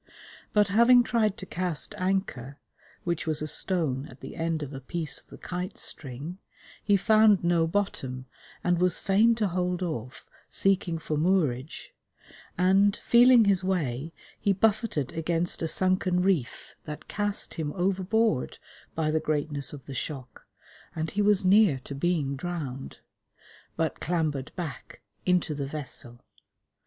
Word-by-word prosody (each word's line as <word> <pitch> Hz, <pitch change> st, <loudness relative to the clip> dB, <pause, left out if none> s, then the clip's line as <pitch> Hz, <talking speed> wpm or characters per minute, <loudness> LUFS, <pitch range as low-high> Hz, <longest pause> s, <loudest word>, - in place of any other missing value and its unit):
But 210 Hz, -1 st, +3 dB
having 235 Hz, +4 st, +6 dB
tried 220 Hz, -4 st, +1 dB
to 190 Hz, -, -7 dB
cast 180 Hz, -4 st, -3 dB
anchor, 185 Hz, -9 st, -2 dB, 0.5 s
which 170 Hz, -2 st, -2 dB
was 155 Hz, -1 st, 0 dB
a 155 Hz, -, -2 dB
stone 150 Hz, -6 st, -1 dB
at 130 Hz, -3 st, -14 dB
the -, -, -9 dB
end 165 Hz, -2 st, -1 dB
of 145 Hz, 0 st, -7 dB
a 135 Hz, -, -7 dB
piece 160 Hz, +3 st, -2 dB
of -, -, -23 dB
the -, -, -12 dB
kite 180 Hz, +2 st, -5 dB
string, 145 Hz, +7 st, -3 dB, 0.4 s
he 205 Hz, -1 st, +4 dB
found 215 Hz, -1 st, +5 dB
no 170 Hz, -1 st, +3 dB
bottom, 135 Hz, -9 st, -2 dB, 0.4 s
and 175 Hz, -1 st, +2 dB
was 180 Hz, -1 st, +2 dB
fain 215 Hz, +4 st, +3 dB
to 215 Hz, -3 st, 0 dB
hold 180 Hz, 0 st, -1 dB
off, 125 Hz, -7 st, -5 dB, 0.2 s
seeking 185 Hz, -3 st, +1 dB
for 155 Hz, -1 st, -3 dB
moorage, 155 Hz, -5 st, 0 dB, 0.6 s
and, 195 Hz, +3 st, +4 dB
feeling 240 Hz, -1 st, +6 dB
his 195 Hz, -2 st, +3 dB
way, 160 Hz, -6 st, -1 dB, 0.3 s
he 200 Hz, -, +2 dB
buffeted 210 Hz, -, +1 dB
against 165 Hz, +1 st, -1 dB
a 165 Hz, -, 0 dB
sunken 185 Hz, +1 st, +1 dB
reef 180 Hz, -10 st, -1 dB
that 150 Hz, -1 st, -8 dB
cast 205 Hz, -1 st, -2 dB
him 155 Hz, -3 st, -3 dB
overboard 195 Hz, -, 0 dB, 0.4 s
by 155 Hz, -1 st, 0 dB
the 160 Hz, -, +2 dB
greatness 150 Hz, -2 st, -1 dB
of 145 Hz, -3 st, -10 dB
the 140 Hz, -, -7 dB
shock, 130 Hz, -1 st, -6 dB, 0.5 s
and 160 Hz, -1 st, -3 dB
he 205 Hz, -, 0 dB
was 205 Hz, -1 st, +3 dB
near 195 Hz, -6 st, +5 dB
to 140 Hz, -, -7 dB
being 140 Hz, -2 st, 0 dB
drowned, 140 Hz, -4 st, -6 dB, 0.7 s
but 160 Hz, -3 st, -1 dB
clambered 155 Hz, -6 st, -1 dB
back 155 Hz, -8 st, -7 dB, 0.2 s
into 180 Hz, -3 st, +2 dB
the 140 Hz, -2 st, -4 dB
vessel. 130 Hz, -5 st, -8 dB
175 Hz, 145 wpm, -27 LUFS, 150-195 Hz, 0.7 s, having